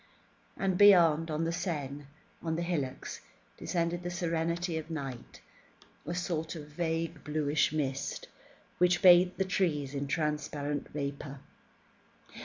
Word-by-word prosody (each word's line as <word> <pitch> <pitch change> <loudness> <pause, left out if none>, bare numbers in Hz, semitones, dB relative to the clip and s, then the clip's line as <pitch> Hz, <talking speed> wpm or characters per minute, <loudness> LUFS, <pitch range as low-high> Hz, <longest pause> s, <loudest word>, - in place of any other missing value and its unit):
And 190 -2 0
beyond, 170 -6 +6
on 155 +1 -1
the 165 - 0
Seine, 145 -5 -3 0.4
on 160 -1 -2
the 170 - -1
hillocks, 150 -7 -3 0.3
descended 170 0 -1
the 175 - -4
serenity 170 -1 -1
of 160 +1 -9
night, 135 -7 -6 0.7
a 170 - -2
sort 170 -3 -2
of 150 -2 -8
vague 165 0 -2
bluish 150 0 +1
mist, 135 -3 -2 0.5
which 180 +2 +3
bathed 180 0 +7
the 190 - +1
trees 155 -7 0
in 140 0 -3
transparent 150 -1 -2
vapour. 140 -1 -5
160 Hz, 125 wpm, -31 LUFS, 145-175 Hz, 0.7 s, bathed